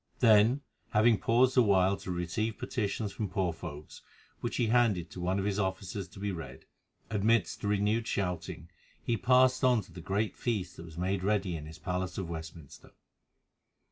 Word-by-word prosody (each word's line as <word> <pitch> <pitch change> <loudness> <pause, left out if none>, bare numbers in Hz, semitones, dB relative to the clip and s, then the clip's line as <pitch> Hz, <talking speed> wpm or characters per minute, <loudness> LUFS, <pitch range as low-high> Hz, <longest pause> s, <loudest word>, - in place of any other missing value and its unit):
Then, 115 +3 +5 0.3
having 110 0 +4
paused 125 +5 +3
a - - +8
while 95 -3 +4
to - - -9
receive 90 +6 -2
petitions 105 -2 -2
from 105 0 -4
poor 90 -3 0
folk, 75 -3 -8 0.5
which - - -3
he 120 - +2
handed 110 -8 +2
to 90 - -8
one 90 +2 0
of 95 - -1
his 100 0 0
officers 95 0 -3
to 90 - -14
be 100 0 -2
read, 85 -3 -8 0.5
amidst 110 +2 +1
renewed 105 +3 +1
shouting 90 -3 -3 0.3
he 120 - +1
passed 130 +3 +4
on 125 -3 +4
to 90 - -18
the 85 +1 -9
great 100 +5 -1
feast 105 -7 -2
that 85 - -8
was 80 -1 -12
made 95 +1 -1
ready 100 -3 +1
in 75 -1 -7
his 80 - -10
palace 90 +1 -3
of 95 - -3
Westminster. 80 -2 -9
100 Hz, 175 wpm, -30 LUFS, 90-110 Hz, 0.5 s, a